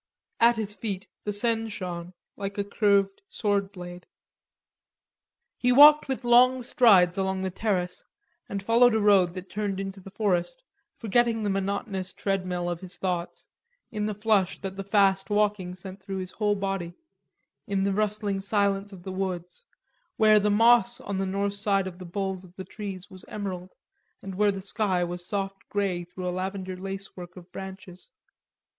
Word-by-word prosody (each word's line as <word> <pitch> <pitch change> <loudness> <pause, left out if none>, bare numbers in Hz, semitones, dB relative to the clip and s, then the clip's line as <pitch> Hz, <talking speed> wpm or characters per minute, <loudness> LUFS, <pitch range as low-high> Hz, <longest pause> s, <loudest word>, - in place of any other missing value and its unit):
At 235 +1 +6
his 215 -2 -3
feet 200 -3 -4 0.2
the 210 - 0
Seine 225 +2 +1
shone 180 -4 -6 0.2
like 200 0 -5
a 205 - +1
curved 200 -1 +2
sword 205 - 0
blade. 175 -1 -9 1.5
He 250 - +3
walked 295 +4 +8
with 265 -1 -3
long 250 +1 +5
strides 195 -7 +5
along 190 0 -1
the 190 - -2
terrace, 180 -3 -1 0.5
and 200 -1 -4
followed 230 +2 +5
a - - +3
road 195 -4 +4
that 185 0 -7
turned 205 -2 -2
into 195 0 -5
the 195 - -11
forest, 195 - -1 0.3
forgetting 230 0 +1
the 205 - 0
monotonous 195 -1 -2
tread 195 -2 -2
mill 175 -1 -2
of 175 -1 -2
his 185 -1 -8
thoughts, 180 -2 -3 0.5
in 210 -2 -2
the 210 - -3
flush 210 -3 +1
that 190 0 -5
the 195 - -5
fast 195 -1 +2
walking 205 -3 0
sent 190 +1 -9
through 195 0 -5
his 185 -1 -5
whole 210 -1 0
body, 195 -3 -3 0.7
in 200 -2 0
the 200 0 +1
rustling 210 -1 0
silence 200 0 0
of 185 -3 -12
the 190 - -5
woods, 185 - -4 0.5
where 215 -1 +6
the 210 0 +1
moss 235 +3 +4
on 200 -1 -4
the 195 - -1
north 200 +1 -1
side 200 -1 +1
of 185 -1 -7
the 185 - -8
boles 190 0 -3
of 180 -1 -16
the 190 - -7
trees 195 -3 -7
was 185 -1 -11
emerald, 185 -3 -6 0.5
and 195 - -6
where 205 +2 +3
the 195 -1 -5
sky 190 -2 0
was 175 0 -5
soft 195 -1 -3
grey 195 -4 -1
through 180 +1 -7
a - - 0
lavender 185 0 -4
lacework 190 -1 -7
of 180 0 -13
branches. 190 -1 -9
195 Hz, 175 wpm, -27 LUFS, 185-210 Hz, 1.5 s, walked